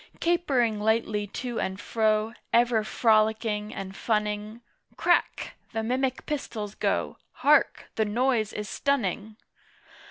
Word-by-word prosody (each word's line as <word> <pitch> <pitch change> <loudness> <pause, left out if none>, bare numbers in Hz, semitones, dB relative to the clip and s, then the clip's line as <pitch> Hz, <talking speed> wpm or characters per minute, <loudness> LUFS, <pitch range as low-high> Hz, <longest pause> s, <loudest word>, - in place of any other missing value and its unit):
Capering 270 -11 +1
lightly 215 -1 +1
to 240 +3 -4
and 190 +1 -2
fro, 220 0 +1 0.2
Ever 235 -2 +3
frolicking 215 -1 +2
and 195 0 -6
funning 210 +1 -2 0.4
"Crack!" - - +1 0.2
the 225 - -1
mimic 255 +2 -1
pistols 220 -8 -4
go! - - -1 0.2
Hark! - - +3
The 220 - +1
noise 230 0 +1
is 210 0 -5
stunning! 220 -5 -1
220 Hz, 115 wpm, -27 LUFS, 210-240 Hz, 0.4 s, Ever